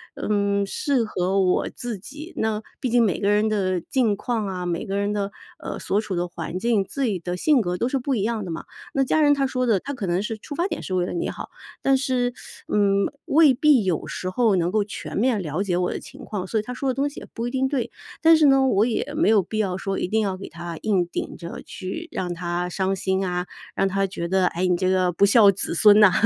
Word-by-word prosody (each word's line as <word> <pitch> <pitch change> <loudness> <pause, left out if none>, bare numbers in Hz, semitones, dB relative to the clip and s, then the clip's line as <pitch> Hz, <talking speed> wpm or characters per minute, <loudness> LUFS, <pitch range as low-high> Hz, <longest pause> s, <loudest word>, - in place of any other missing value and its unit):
嗯， 200 -1 0
适 260 +5 0
合 195 -2 0
我 185 -1 +2
自 240 -5 -6
己。 295 - -10
那， 220 -1 0 0.2
毕 255 - -1
竟 240 0 +4
每 195 -7 +1
个 200 - +1
人 210 +1 +3
的 185 -4 0
境 230 +1 +1
况 225 0 -2
啊， 180 -2 -4
每 175 +2 -2
个 195 +1 -2
人 200 +1 0
的， 200 -1 -2 0.3
呃， - - -5
所 205 - 0
处 200 -4 -4
的 175 0 -1
环 175 0 -5
境， 220 0 +2
自 275 - -3
己 210 -7 0
的 175 +1 -4
性 285 - +3
格 180 -3 -2
都 235 - 0
是 270 +1 0
不 265 +1 -1
一 205 - 0
样 225 -1 -1
的 185 - -6
嘛。 165 - -5 0.3
那 275 - +3
家 310 +4 +2
人 290 -1 +5
他 275 -1 +1
说 255 -1 -1
的， 215 -5 +3
他 280 - -6
可 230 -8 -4
能 175 +3 0
是 220 +1 -3
出 290 - -8
发 345 +4 0
点 325 - -4
是 185 - -3
为 180 -1 +1
了 - - -4
你 345 - -2
好， - - -7 0.3
但 270 - +4
是， 255 -2 0 0.3
嗯， 200 -1 +2 0.2
未 300 -2 +5
必 270 -2 +4
有 180 -4 -1
时 185 - -5
候 220 0 +3
能 175 -1 +1
够 215 +1 +2
全 200 - -7
面 235 +1 +2
了 165 -1 -3
解 185 -3 0
我 180 0 0
的 - - -4
情 270 -2 -12
况， 190 -4 -4
所 220 - 0
以 - - -3
他 250 - -6
说 270 +2 -2
的 255 - -1
东 275 +2 +1
西 290 - -7
也 - - -11
不 230 +1 -2
一 - - -4
定 265 0 +1
对。 265 -4 -2 0.3
但 325 0 +8
是 310 -2 +5
呢， 270 -1 +5
我 215 -2 +3
也 250 +5 -2
没 315 - +3
有 215 -3 +5
必 215 +4 -4
要 190 -4 0
说 195 0 -3
一 - - -1
定 220 +4 +1
要 195 -2 -1
给 190 - -9
他 170 0 -7
硬 195 -5 +2
顶 - - -5
着 170 -1 -7
去 215 - -6
让 180 -1 -3
他 175 +1 -2
伤 190 +1 -1
心 190 0 -1
啊， 180 0 -2 0.3
让 195 - +2
他 195 0 0
觉 170 -2 -4
得， 185 0 +2
哎， 180 +1 -1
你 180 -1 +3
这 185 +1 0
个 185 -1 +2
不 200 +4 +3
孝 205 -1 +7
子 195 -3 -2
孙 210 +4 +7
呐， 210 -3 +7
205 Hz, 280 characters per minute, -23 LUFS, 185-250 Hz, 0.3 s, 但